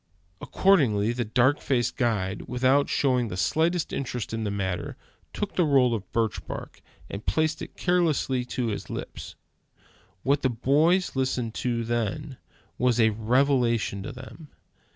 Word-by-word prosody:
Accordingly, 120 - +3
the 120 0 -1
dark 125 +6 +2
faced 120 -3 0
guide, 105 -6 -1
without 130 +3 +2
showing 125 -4 +1
the 90 - -5
slightest 165 - +1
interest 125 -5 -4
in 110 -1 -2
the - - -1
matter, 95 -3 -3 0.3
took 205 - -4
the 180 - +3
roll 135 -5 +4
of 100 -5 -5
birch 115 -1 -1
bark, - - -7 0.3
and 100 +2 -7
placed 155 -1 0
it - - -9
carelessly 160 -8 +1
to 125 -1 -2
his 105 - -5
lips. - - -7 0.9
What 140 +2 +2
the 130 - +2
boys 150 +10 +2
listened 130 -3 -1
to 120 -2 -1
then, 120 +5 -2 0.4
was 125 -1 +2
a 110 -1 +5
revelation 120 -2 +1
to 100 - -6
them. 135 +4 -11
125 Hz, 150 wpm, -26 LUFS, 115-140 Hz, 0.9 s, a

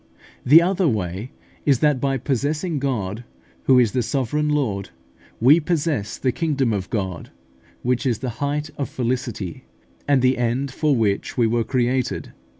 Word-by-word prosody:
The 155 +6 +7
other 185 0 +1
way 100 - -2 0.3
is, 140 -3 +3
that 145 -1 +2
by 135 -1 +1
possessing 145 +5 -1
God, 115 -5 -2 0.4
who 130 - +5
is 120 -4 +4
the 125 - 0
sovereign 140 +4 -1
Lord, 110 -10 -1 0.5
we 140 +8 +6
possess 150 - -1
the 130 - 0
kingdom 140 -6 0
of 95 -2 -3
God, 95 -6 -3 0.5
which 125 +2 0
is 120 -4 +1
the 130 +2 -4
height 145 +2 -1
of 140 - -2
felicity, 120 -7 -3 0.4
and 140 -3 +3
the 130 -1 +3
end 125 +3 0
for 150 -1 +1
which 105 -1 0
we 120 - +4
were 115 +1 +1
created. 125 +1 -1
130 Hz, 155 wpm, -22 LUFS, 115-145 Hz, 0.5 s, The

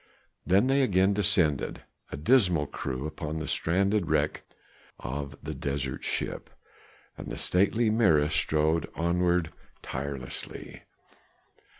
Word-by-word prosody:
Then 95 +5 +4
they 135 +1 +3
again 95 -5 +3
descended, 85 -7 +1 0.3
a - - -5
dismal 90 - +3
crew, 70 -1 -5
upon 75 0 -5
the 80 - -4
stranded 95 +1 +1
wreck 75 -1 +1 0.6
of 70 +2 -5
the - - -4
desert 70 -2 -3
ship. - - -3 0.7
And - - -7
the - - -5
stately 110 +5 +2
Mirah 80 -10 +3
strode 80 +2 +1
onward 85 0 +1 0.3
tirelessly. 65 -1 -6
80 Hz, 110 wpm, -28 LUFS, 75-95 Hz, 0.7 s, Then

